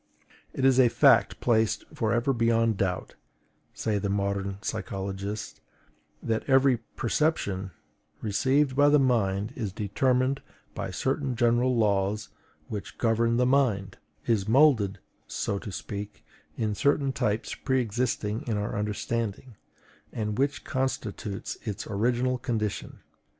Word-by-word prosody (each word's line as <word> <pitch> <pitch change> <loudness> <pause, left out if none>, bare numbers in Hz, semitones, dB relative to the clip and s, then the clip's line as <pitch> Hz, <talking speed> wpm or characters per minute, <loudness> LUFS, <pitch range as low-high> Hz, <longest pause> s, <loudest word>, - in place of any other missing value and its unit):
It 130 - -1
is 135 -1 +5
a 125 -2 +6
fact - - +4
placed 110 -2 +2
for 110 - 0
ever 120 +3 +2
beyond 115 -2 +2
doubt, 95 -2 -2 0.6
say 105 -2 -1
the 100 0 -2
modern 100 0 -1
psychologists, 100 0 -4 0.6
that 110 -1 0
every 135 -1 +5 0.2
perception 105 -8 0 0.5
received 130 +6 +1
by 145 +1 +5
the 150 - +6
mind 110 -5 +1
is 110 -6 -3
determined 125 +7 +1 0.3
by - - -4
certain 135 - -1
general 120 +2 +2
laws 105 -1 +1 0.4
which 105 -2 -6
govern 115 0 +2
the 125 - +3
mind; 120 -8 +1 0.3
is 110 -4 +1
moulded, 125 -7 +4 0.3
so 100 - -2
to 105 - -7
speak, 100 +1 -7 0.3
in 110 -2 0
certain 140 +4 +2
types 105 0 -1
pre 130 -1 0
existing 115 -2 -1
in 110 -3 0
our 105 0 -2
understanding, 110 +2 -3 0.6
and 105 0 -3
which 140 +1 0
constitutes 110 -6 -3
its 105 -2 -4
original 120 +4 0
condition. 110 -5 -3
115 Hz, 125 wpm, -27 LUFS, 100-130 Hz, 0.6 s, a